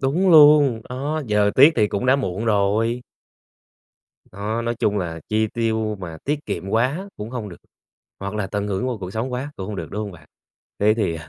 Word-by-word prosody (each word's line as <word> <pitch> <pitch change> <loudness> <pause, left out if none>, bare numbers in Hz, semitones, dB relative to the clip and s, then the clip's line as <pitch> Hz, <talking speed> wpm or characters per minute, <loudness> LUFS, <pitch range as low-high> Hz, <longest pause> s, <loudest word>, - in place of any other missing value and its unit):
Đúng 160 +8 +2
luôn, 145 -6 +7
đó, 145 +5 -3
giờ 105 -1 +2
tiếc 145 +5 +7
thì 105 -3 +3
cũng 100 +6 -2
đã 130 - +5
muộn 110 -5 -3
rồi. 110 +3 +1 1.3
Đó, 105 +4 -3
nói 120 0 -1
chung 105 -4 +1
là 85 -3 -4
chi 110 +1 +1
tiêu 110 -1 -1
mà 85 -3 -7
tiết 150 +1 -2
kiệm 95 - -4
quá 130 - 0
cũng 105 +2 -7
hông 120 -5 -5
được, 85 - -10 0.6
hoặc 100 +1 -5
là 100 -3 -2
tận 100 0 -3
hưởng 100 +3 -2
vô 120 -3 -2
cuộc 95 0 -6
sống 115 +4 -3
quá 130 +4 -4
cũng 95 - -6
hông 105 - -5
được, 85 -5 -5
đúng 105 - -3
hông 105 -2 -5
bạn? 85 - -15 0.5
Thế 105 +1 +4
thì, 100 -7 -1
ờ, 80 -1 -9
110 Hz, 215 wpm, -22 LUFS, 100-130 Hz, 1.3 s, luôn